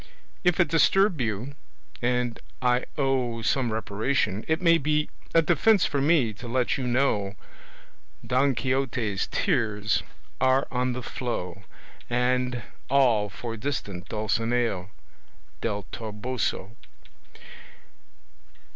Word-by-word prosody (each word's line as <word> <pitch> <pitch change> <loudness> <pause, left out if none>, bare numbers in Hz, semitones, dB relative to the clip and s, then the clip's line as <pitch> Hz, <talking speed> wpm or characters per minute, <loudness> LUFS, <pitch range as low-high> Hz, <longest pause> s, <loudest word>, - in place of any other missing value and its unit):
If 180 -1 +3
it 175 - +5
disturb 165 +1 +3
you, 115 +4 -2 0.5
and 125 -1 0 0.2
I 125 0 +2
owe 130 -5 0
Some 125 +1 +1
reparation, 110 0 -1
it 160 +1 +1
may 170 -2 +5
be 150 +1 0 0.2
a 165 - +6
Defence 185 +6 +4
for 140 - 0
me 140 -7 +3
to 125 - -7
let 125 +1 +1
you 130 -2 -2
know 115 -6 +1 0.9
Don 130 +1 +2
Quixote's 120 -4 -1
tears 105 -1 +1 0.4
are 130 +1 +3
on 125 0 0
the 125 0 -5
flow, 100 -8 -4 0.4
And 125 0 +1 0.3
all 120 -7 +4
for 115 +4 -6
distant 100 -7 -4
Dulcinea 115 -2 0 0.7
Del 105 -3 -2
Toboso. 110 -1 -3
125 Hz, 110 wpm, -26 LUFS, 110-135 Hz, 0.9 s, a